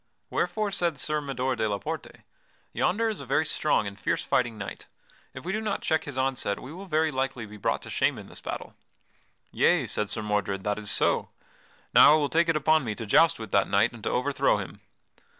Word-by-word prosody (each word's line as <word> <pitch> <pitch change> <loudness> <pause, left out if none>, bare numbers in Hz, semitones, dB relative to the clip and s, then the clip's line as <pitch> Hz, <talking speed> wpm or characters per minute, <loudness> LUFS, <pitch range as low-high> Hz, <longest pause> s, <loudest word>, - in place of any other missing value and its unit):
Wherefore 215 -2 -1
said 170 -5 0
Sir 150 +2 -1
Mador 130 -2 -2
de 110 -2 0
la 100 - -1
Porte: - - -7 0.5
"Yonder 225 +5 +1
is 220 -2 -2
a 140 - -7
very 150 +4 +2
strong 150 -7 +1
and 100 0 -7
fierce - - -1
fighting 120 -3 0
knight; 100 - -7 0.5
if 130 +4 -9
we 185 - -2
do 215 +3 -1
not 215 -2 -2
check 160 -1 +1
his 145 -2 -6
onset 130 -6 -1
we 135 - -9
will 195 +3 -9
very 160 -2 +1
likely 130 -3 -2
be 105 0 -11
brought 100 - -1
to - - -9
shame - - +1
in - - -9
this - - -9
battle." - - -6 0.8
"Yea," - - +3
said 105 -1 -2
Sir 110 0 0
Mordred, 100 -2 -1
"that 105 0 -1
is 105 -1 -1
so. - - +2 0.6
Now - - +9
I - - +4
will 145 -2 0
take 165 +1 +2
it 165 - +2
upon 155 0 +3
me 110 -4 -3
to 115 - -6
joust 165 +10 +4
with 110 -3 -8
that 100 - +2
knight 105 +4 +3
and 120 - -11
to - - -1
overthrow 135 +3 +1
him." - - -7
130 Hz, 220 wpm, -27 LUFS, 105-160 Hz, 0.8 s, Now